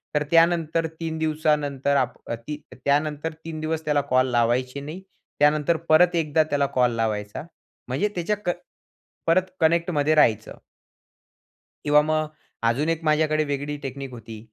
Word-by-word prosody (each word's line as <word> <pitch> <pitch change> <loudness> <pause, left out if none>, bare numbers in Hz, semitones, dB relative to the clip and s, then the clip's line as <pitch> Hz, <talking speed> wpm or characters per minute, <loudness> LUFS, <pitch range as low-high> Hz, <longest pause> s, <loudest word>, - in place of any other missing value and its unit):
तर 150 - +2
त्यानंतर 165 -1 +3
3 160 -1 -3
दिवसानंतर 150 -3 0
आप 130 -2 0
ती 115 +6 -5 0.2
त्यानंतर 150 +2 -1
3 160 -1 -5
दिवस 160 0 -3
त्याला 150 -1 +2
कॉल 130 0 +4
लावायचे 120 +3 +1
नाही. 155 +6 -7 0.4
त्यानंतर 150 +2 +3
परत 175 +3 +5
एकदा 155 -1 +2
त्याला 145 -2 0
कॉल 125 -1 +4
लावायचा, 105 +1 -2 0.4
म्हणजे 135 +12 0
त्याच्या 185 +4 -1
क 175 - +1 0.7
परत 185 +3 +2
कनेक्टमध्ये 160 -2 +2
राहायचं. 110 -8 +2 1.3
किंवा 150 0 +5
मग 155 0 0 0.4
अजून 145 +7 0
एक 165 0 -1
माझ्याकडे 155 0 +2
वेगळी 145 +1 -3
टेक्निक 135 0 -6
होती, 115 -2 -9
150 Hz, 135 wpm, -24 LUFS, 135-160 Hz, 1.3 s, परत